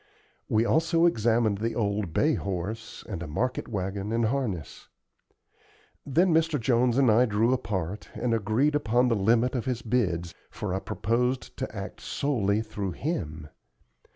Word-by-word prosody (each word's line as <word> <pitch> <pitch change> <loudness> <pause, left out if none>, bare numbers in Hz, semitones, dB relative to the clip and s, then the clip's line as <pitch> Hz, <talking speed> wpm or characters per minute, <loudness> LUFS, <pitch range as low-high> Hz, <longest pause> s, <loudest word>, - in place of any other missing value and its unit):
We 110 +1 +3
also 165 +4 +3
examined 115 -7 +2
the 115 +1 -2
old 100 -5 -1
bay 150 - +2
horse 100 +3 -4
and 95 -6 -5
a 85 - -5
market 125 +12 -2
wagon 100 0 -3
and 115 0 +1
harness. 110 - -3 1.2
Then 170 +6 +3
Mr. 160 -2 +2
Jones 120 0 +2
and 130 -4 +5
I 120 +4 +5
drew 110 +4 +2
apart 105 -5 -3
and 120 -1 0
agreed 115 +7 +2
upon 125 -3 +2
the 115 - +2
limit 115 +5 +2
of 125 -3 -2
his 125 -3 -2
bids, 90 -8 0 0.2
for 105 -4 -4
I 95 - 0
proposed 125 +7 -1
to - - -5
act - - -7
solely 110 -7 0
through 100 -4 -4
him. 80 - -4
115 Hz, 155 wpm, -27 LUFS, 100-125 Hz, 1.2 s, and